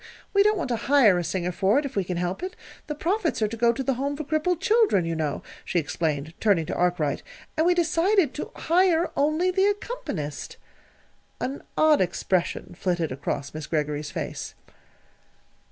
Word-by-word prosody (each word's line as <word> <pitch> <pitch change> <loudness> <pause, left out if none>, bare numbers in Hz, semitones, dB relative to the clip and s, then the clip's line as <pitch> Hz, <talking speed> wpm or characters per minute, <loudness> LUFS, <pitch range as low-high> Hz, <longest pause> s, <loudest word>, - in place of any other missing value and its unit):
We 400 - +5
don't 425 +1 +4
want 335 - -2
to 240 - +1
hire 240 -9 +4
a - - -2
singer 180 +1 -2
for 195 +6 +2
it, 290 - +1
if 275 - -6
we 200 - +1
can 180 -1 -3
help 180 - -2
it. 370 +1 -5 0.3
The 300 - -3
profits 330 - 0
are - - +3
to 225 - -5
go 235 +1 +4
to 265 +3 -3
the 270 - +1
Home 280 +3 -2
for 310 - -3
Crippled 310 +3 0
Children, 420 - +3
you 165 0 -2
know," 155 -2 -2 0.2
she - - -2
explained, 155 -1 -1
turning 195 -7 +3
to - - -4
Arkwright, 175 -5 +1 0.3
"and 320 +2 +2
we 355 - +4
decided 345 -1 +2
to - - -5
hire 345 0 +2
only 310 +6 +2
the 380 +2 +2
accompanist." 405 - -4 0.8
An 270 +2 -3 0.2
odd 310 -5 +5
expression 180 0 -1
flitted 175 -4 -1
across 140 +1 -4
Miss 155 -1 -6
Greggory's 150 -1 -1
face. - - -5
240 Hz, 185 wpm, -25 LUFS, -, 0.8 s, We